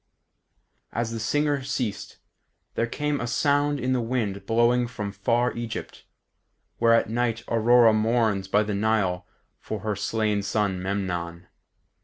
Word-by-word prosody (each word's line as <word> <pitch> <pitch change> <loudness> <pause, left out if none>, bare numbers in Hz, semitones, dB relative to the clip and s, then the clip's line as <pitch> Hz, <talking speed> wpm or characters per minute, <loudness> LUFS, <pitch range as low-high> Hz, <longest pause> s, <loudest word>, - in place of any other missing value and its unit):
As 115 -1 -2
the 115 - -4
singer 145 +4 0
ceased, 125 -6 -4 0.6
there 115 - 0
came 145 +3 -2
a 120 - -2
sound 145 +3 +1
in 130 +1 0
the 125 - +1
wind 110 -5 -2
blowing 120 +2 +3
from 105 -4 -5
far 115 +5 0
Egypt, 115 -1 -6 0.7
where 115 0 +5
at - - +2
night 115 0 -1
Aurora 115 0 +5
mourns 110 -3 +1
by 105 +2 +3
the 105 0 -3
Nile 100 -4 0 0.3
for 110 -2 -5
her 105 0 -2
slain 105 +1 0
son 100 -2 -1
Memnon. 90 -3 -3
115 Hz, 140 wpm, -25 LUFS, 100-120 Hz, 0.7 s, where